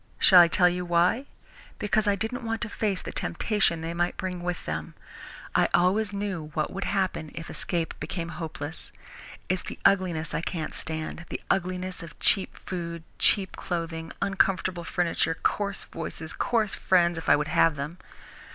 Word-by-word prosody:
Shall 185 - +8
I 170 - +7
tell 180 +2 +4
you 180 0 0
why? 175 +10 +2 0.5
Because 210 +1 +1
I 200 - +4
didn't 220 +4 -2
want 225 0 -2
to 235 - -2
face 200 -3 -1
the - - -5
temptation 180 -3 +1
they 165 +1 -3
might 175 +1 0
bring 185 -2 -3
with 175 0 -3
them. 80 0 -4 0.6
I - - +4
always 195 +4 +3
knew 195 -6 -3
what 155 - -1
would 195 +1 -3
happen 190 -5 0
if 165 0 -6
escape 170 -2 -2
became 165 +2 -4
hopeless. 160 -3 -6 0.6
It's 185 0 0
the - - -7
ugliness 175 -5 +3
I - - 0
can't 165 -2 -3
stand 160 +1 -5
the - - -3
ugliness 185 0 -1
of 165 -1 -10
cheap 195 - +2
food, 170 -2 -4 0.2
cheap 195 -3 +3
clothes, 165 -2 -4
uncomfortable 190 -2 +1
furniture, 165 -2 0
coarse 200 -1 0
voices, 160 -1 -6
coarse 220 -4 +1
friends 175 -2 +3
if 165 - -3
I - - +8
would 150 +1 -1
have 165 0 +4
them. 150 +6 -5
175 Hz, 170 wpm, -27 LUFS, 165-195 Hz, 0.6 s, Shall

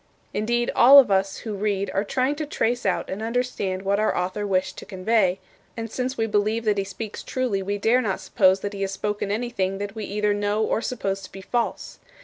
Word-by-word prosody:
Indeed, 240 +3 0
all 270 +4 +9
of 265 -7 +7
us 195 0 +1
who 220 - -3
read 200 -1 -1
are 195 - +1
trying 255 +6 0
to 305 -1 -3
trace 240 -5 0
out 190 - 0
and 195 +3 -5
understand 225 -5 -2
what 200 +1 +1
our 215 - +1
author 185 +3 -2
wished 185 -1 0
to - - -9
convey; 190 -1 +1 0.4
and 225 -1 -5
since 255 +2 -3
we 225 - +1
believe 215 +1 0
that 210 -2 +2
he - - +1
speaks 200 +2 -7
truly 250 -7 -1
we 200 +2 -2
dare 230 +5 +3
not 205 -5 -1
suppose 190 -1 +3
that 205 0 -4
he 200 - -6
has 195 - 0
spoken 205 +1 -2
anything 205 -3 -1
that 200 0 -5
we 220 -2 -5
either 210 +1 0
know 205 +1 0
or 220 - 0
suppose 195 -6 -2
to 190 - -11
be 195 - -9
false. 235 +4 -3
205 Hz, 220 wpm, -24 LUFS, 195-230 Hz, 0.4 s, all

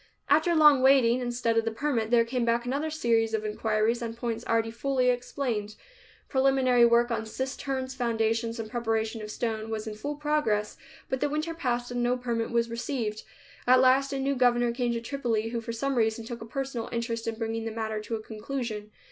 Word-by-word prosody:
After 315 +4 +4
long 300 -4 +7
waiting, 260 -2 +5
instead 240 -2 -1
of 225 - +3
the 225 - 0
permit 230 -1 -1
there 235 -1 +4
came 245 +1 -1
back 235 +1 +1
another 280 +5 -1
series 230 -7 +1
of 215 0 -3
inquiries 215 +2 0
on 230 -1 -4
points 230 -1 -3
already 225 0 +1
fully 255 +1 +1
explained. 245 -4 -3 0.5
Preliminary 260 -3 +4
work 235 +1 +3
on 220 -1 -2
cisterns, 260 +1 -3
foundations 230 -1 0
and 225 - -4
preparation 225 -2 -1
of 210 - -7
stone 220 0 -3
was 220 -1 -3
in 220 - -5
full 285 +8 -4
progress, 295 -9 0 0.3
but 260 - -2
the 290 - 0
winter 305 +3 -2
passed 245 -6 -2
and 245 0 -1
no 245 +1 +1
permit 235 -2 -2
was 235 -1 +1
received. 230 -2 -3 0.5
At 255 +1 +7
last 265 +2 +4
a 275 - -2
new 270 +1 0
governor 245 -2 +3
came 240 0 -1
to 230 - -2
Tripoli 230 -3 -1
who 235 0 -3
for 230 - -5
some 275 +4 -1
reason 225 -1 +1
took 235 0 -7
a 225 - -7
personal 265 -1 -4
interest 230 -1 -3
in 225 - -1
bringing 225 0 -3
the 225 - -3
matter 220 -1 -3
to 225 +2 -4
a 215 - -6
conclusion. 220 -1 -5
235 Hz, 200 wpm, -28 LUFS, 225-260 Hz, 0.5 s, long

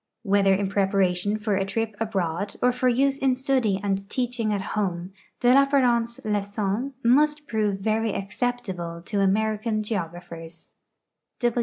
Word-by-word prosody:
Whether 195 -2 +3
in 200 0 -1
[)reparation 195 0 +1
for 210 -1 0
a 195 - +1
tri|> 220 +3 -2
abroad 200 -3 -2
or 250 - +3
for 250 +1 0
use 270 +3 +2
in 265 -1 +2
study 255 -7 +1
and 195 0 -2
teach 245 -1 -2
ing 215 -2 +1
at 200 -2 -3
home, 185 -3 -2 0.3
de 245 - +4
Lapjiarent's 250 -4 +3
Lxcom 210 +4 -1
must 295 +5 +3
prove 210 -3 0
very 220 +1 0
acceptable 195 -5 -3
to 210 - -3
Ameri 210 +2 +1
can 215 -1 -1
geographers. 170 -4 -6
210 Hz, 145 wpm, -25 LUFS, 195-240 Hz, 0.3 s, de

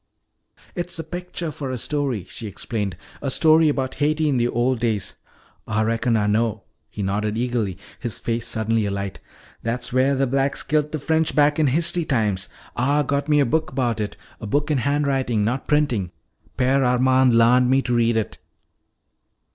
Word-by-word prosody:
"It's 175 -1 -2
a 165 - -4
picture 175 0 -5
for 140 -1 -5
a 130 - -3
story," 135 - -1
she 110 +4 -6
explained. 100 -2 -4 0.2
"A 140 - -2
story 155 +3 +4
about 135 -3 -1
Haiti 155 +2 +1
in 140 -3 +1
the 120 0 +2
old 120 +1 0
days 110 -5 -1 0.3
" - - -34
"Ah 110 0 0
reckon 115 +1 +1
Ah 105 - +1
know," 110 0 0 0.3
he 105 - -5
nodded 105 +2 -1
eagerly, 115 -6 -1 0.2
his 120 -4 -2
face 115 0 -2
suddenly 110 -1 0
alight. 100 -1 -4 0.4
"That's 115 +1 -3
wheah 130 +2 +3
th' 135 0 +1
blacks 135 0 0
kilt 150 -1 0
th' 155 - -3
French 160 0 0
back 150 +1 +3
in 155 - +4
history 170 +4 +1
times. 105 -9 0 0.3
Ah 140 +4 +2
got 140 +2 -1
me 150 -1 +4
a - - +3
book 155 +1 -1
'bout 120 -4 0
it. 105 - -4 0.2
A 110 - -6
book 145 +7 0
in 145 - +2
handwritin', 135 -5 0
not 125 +4 -2
printin'. 135 -11 +1 0.5
Père 135 +2 +3
Armand 130 0 +3
larned 125 +2 +5
me 135 +1 +3
to 125 - -1
read 115 -1 +2
it." 110 -4 -3
125 Hz, 180 wpm, -22 LUFS, 115-145 Hz, 0.5 s, larned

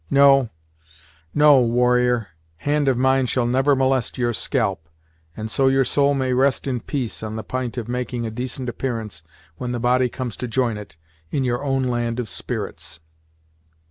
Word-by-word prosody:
No, 135 -3 +5 0.8
no, 150 -2 +6
warrior, 125 -2 +2 0.3
hand 145 - 0
of 130 -3 +3
mine 130 0 +3
shall 125 0 +1
never 135 +4 +3
molest 130 -1 +1
your 120 -1 0
scalp, 100 - -1 0.5
and 110 0 -5
so 135 +2 +2
your 135 0 +3
soul 140 +2 +2
may 130 -2 0
rest 130 +2 +2
in 130 -3 -1
peace 130 -2 -4
on 110 0 -5
the 110 - -4
p'int 130 -1 -4
of 115 -2 -3
making 125 -1 -3
a 110 - -3
decent 125 +2 -4
appearance 115 -8 -4 0.4
when 125 +4 -4
the 120 - -2
body 125 +1 +2
comes 125 -3 -5
to 125 - -4
join 120 -1 0
it, 105 -6 -9 0.3
in 140 - -1
your 120 +1 -1
own 135 -2 0
land 120 -1 -1
of 120 -4 -3
spirits." 80 - -5
125 Hz, 175 wpm, -22 LUFS, 120-135 Hz, 0.8 s, no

